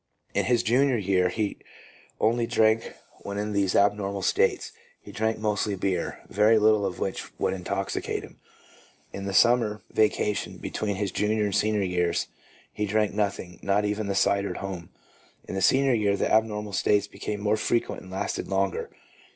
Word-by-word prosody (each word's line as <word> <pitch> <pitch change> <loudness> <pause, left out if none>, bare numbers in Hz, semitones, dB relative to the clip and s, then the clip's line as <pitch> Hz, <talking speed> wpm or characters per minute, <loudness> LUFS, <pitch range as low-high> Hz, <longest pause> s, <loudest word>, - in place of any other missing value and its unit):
In - - +1
his 120 -1 +2
junior 130 +2 +3
year 95 -3 +2
he 105 +1 -2 0.6
only 115 +1 +2
drank 110 0 +3 0.4
w - - -13
r 100 - -4
hen - - -4
in 105 +1 -2
these 100 -2 +1
abnormal 100 -1 +1
states. - - +1 0.3
He - - -12
drank 110 +1 -1
mostly 105 -1 -1
beer, 95 -2 -2
very 105 +2 +4
little 105 -1 +4
of 90 - -5
which 95 - -3
would - - 0
intoxicate 95 +1 -3
him. - - -13 0.7
In 100 - -5
the 100 - -3
summer 115 -3 +3
vacation, 105 -1 0
between 105 -2 -3
his 100 -1 -2
junior 105 +1 0
and 100 -1 -1
senior 105 -1 +2
years, 90 -2 0 0.4
he 105 - -2
drank 105 0 +1
nothing, 100 -4 -2
not 100 +1 +1
even 105 0 -2
the 100 - -1
cider 100 0 +2
at - - -5
home. 95 -4 -6 0.6
In - - -6
the 95 - -2
senior 135 +3 +4
year 100 -3 +2
the - - 0
abnormal 105 -2 +1
states 100 +1 +2
became 105 0 -5
more 105 +1 +1
frequent 115 +2 -1
and 95 - -13
lasted 95 +2 -3
longer. 95 -1 -1
105 Hz, 175 wpm, -26 LUFS, 100-110 Hz, 0.7 s, very